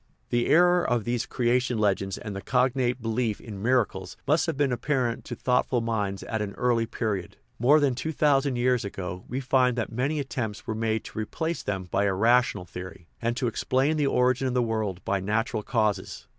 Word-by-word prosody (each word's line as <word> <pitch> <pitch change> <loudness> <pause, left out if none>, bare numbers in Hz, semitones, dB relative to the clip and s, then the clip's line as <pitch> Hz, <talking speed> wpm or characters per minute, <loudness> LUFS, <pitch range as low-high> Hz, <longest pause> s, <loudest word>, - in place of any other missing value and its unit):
The 120 0 +1
error 175 +2 +5
of 120 -3 +1
these 120 0 -1
creation 125 0 +1
legends 100 -2 0
and 105 -4 -6
the 100 - -5
cognate 125 0 +1
belief 115 -1 -1
in 105 -4 -8
miracles 110 -5 0
must 155 +5 +3
have 160 -4 -2
been 140 -2 +2
apparent 125 -2 -1
to 120 - -5
thought 125 +2 +1
ful 125 - +1
minds 105 -4 -2
at 110 -1 -3
an 100 -1 -3
early 120 -2 +1
period; 105 -6 -3 0.2
more 140 +6 +5
than 140 -3 +2
two 155 +6 -3
thousand 140 -3 +2
years 125 0 +2
ago 90 -2 -5
we 125 - -3
find 130 -2 +2
that 115 - -2
many 135 +6 -1
attempts 120 -6 -4
were 110 - -2
made 110 0 -1
to - - -7
replace 160 +10 -3
them 95 -2 -3
by 95 +3 0
a 95 -1 +1
rational 115 -2 +3
theory, 90 -1 -9
and 120 +1 -1
to 130 - -1
explain 130 +5 +1
the 150 -2 +1
origin 130 0 +2
of 125 - -2
the 125 - +3
world 110 -5 -2
by 100 0 +1
natural 110 +3 -1
causes. 110 -2 -1
120 Hz, 200 wpm, -26 LUFS, 105-130 Hz, 0.2 s, error